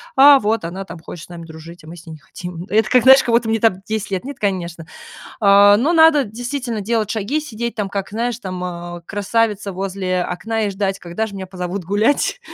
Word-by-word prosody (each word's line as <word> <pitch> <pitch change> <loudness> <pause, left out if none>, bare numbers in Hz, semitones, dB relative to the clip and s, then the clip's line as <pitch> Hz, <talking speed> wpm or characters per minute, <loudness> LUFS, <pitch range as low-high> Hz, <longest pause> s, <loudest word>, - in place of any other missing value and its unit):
"А 280 +1 +8
вот 220 -2 -1
она 185 +4 -5
там 170 -1 -10
хочет 165 0 -9
с - - -25
нами 170 -1 -9
дружить, 165 +2 -12
а - - -14
мы 170 +2 -10
с 170 - -14
ней 165 - -9
не 155 - -12
хотим". 175 0 -9
Это 215 +1 +2
как 250 -1 +4
знаешь, 265 +1 +8
как 235 - +1
будто 235 -1 +1
мне 225 0 +1
там 225 -3 +3
10 215 -1 -4
лет. 190 -2 -2
Нет, 275 +1 -8
конечно. 175 -5 -3 0.6
А, 200 0 +6
но 285 +9 +1
надо, 320 -3 +6
действительно, 240 +1 -4
делать 220 0 -1
шаги, 225 +8 -1
сидеть 235 -5 -5
там, 210 -3 -2
как 195 -1 -4
знаешь, 235 +2 -2
там, 185 -4 -5 0.3
э, - - -16
красавица 205 0 -1
возле 185 -1 -2
окна 220 +6 -3
и - - -2
ждать, 195 0 -2
когда 175 +6 -4
же 205 - -10
меня 190 -1 -6
позовут 180 0 -5
гулять. 215 - +1
205 Hz, 225 wpm, -19 LUFS, 180-230 Hz, 0.6 s, А